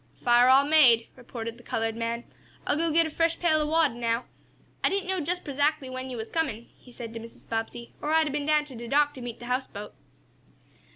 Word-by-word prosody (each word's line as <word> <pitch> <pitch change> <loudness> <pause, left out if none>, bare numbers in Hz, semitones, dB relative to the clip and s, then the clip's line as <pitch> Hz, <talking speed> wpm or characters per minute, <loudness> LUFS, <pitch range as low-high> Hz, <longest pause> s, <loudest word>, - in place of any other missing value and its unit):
"Fire 245 +1 +4
all 270 +2 +6
made," 260 -7 +5
reported 235 -2 -7
the - - -16
colored 225 -2 -2
man. 230 +1 -3 0.4
"I'll - - +1
go 330 +1 0
git 330 +2 +4
a - - -3
fresh 330 +1 +1
pail 315 -3 +3
ob 300 - -1
water 320 -4 +3
now. 235 0 -1 0.6
I - - +4
didn't 390 -1 -1
know 380 -1 0
jest 350 +3 -2
prezackly 285 -1 0
when 255 0 -5
yo' 250 - -5
was 220 0 -6
comin'," 240 -9 -2
he 250 - -18
said 235 -2 -8
to 230 - -5
Mrs. 230 +1 -13
Bobbsey, 225 +1 -4
"or 300 - -2
I'd 320 0 +4
a' - - -2
been 290 0 -2
down 300 -1 +3
to 275 -4 -11
de 235 +1 -7
dock 290 +3 +3
t' 260 - -9
meet 240 -2 -6
de 240 - -10
houseboat." 250 -5 -4
260 Hz, 230 wpm, -27 LUFS, 235-310 Hz, 0.6 s, all